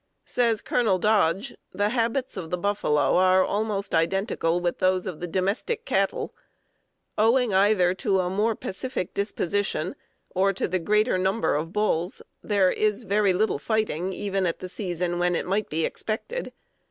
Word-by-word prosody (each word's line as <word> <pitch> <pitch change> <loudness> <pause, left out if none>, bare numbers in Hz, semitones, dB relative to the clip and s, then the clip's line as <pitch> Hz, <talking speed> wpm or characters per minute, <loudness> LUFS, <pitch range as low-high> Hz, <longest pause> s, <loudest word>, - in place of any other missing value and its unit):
Says 230 -3 +1
Colonel 215 -6 +2
Dodge: 205 +3 +1 0.2
"The 205 +1 +1
habits 240 +2 -1
of 175 -5 -6
the 180 - -1
buffalo 175 -7 +1
are 185 0 +5
almost 205 -1 -2
identical 170 0 +1
with 175 -1 -2
those 185 0 +2
of 180 -5 -5
the 175 - -4
domestic 195 - -1
cattle. - - 0 0.9
Owing 230 0 +3
either 190 -2 +4
to 195 -1 0
a 180 - -2
more 210 +5 +1
pacific 195 -1 -4
disposition, 200 -3 -1 0.4
or 195 +1 +2
to 195 - -1
the 185 - -1
greater 210 +3 +2
number 190 +4 +1
of 160 +3 -2
bulls, 190 -4 -1 0.2
there, 200 -3 +2
is 215 +2 0
very 205 -1 +2
little 215 +4 +1
fighting, 210 -5 -1
even 195 -1 -1
at 165 - -2
the 185 - -7
season 175 -2 -2
when 175 0 +2
it - - -2
might 200 +3 -1
be 160 +1 0
expected. 450 - -4
195 Hz, 160 wpm, -25 LUFS, 180-215 Hz, 0.9 s, are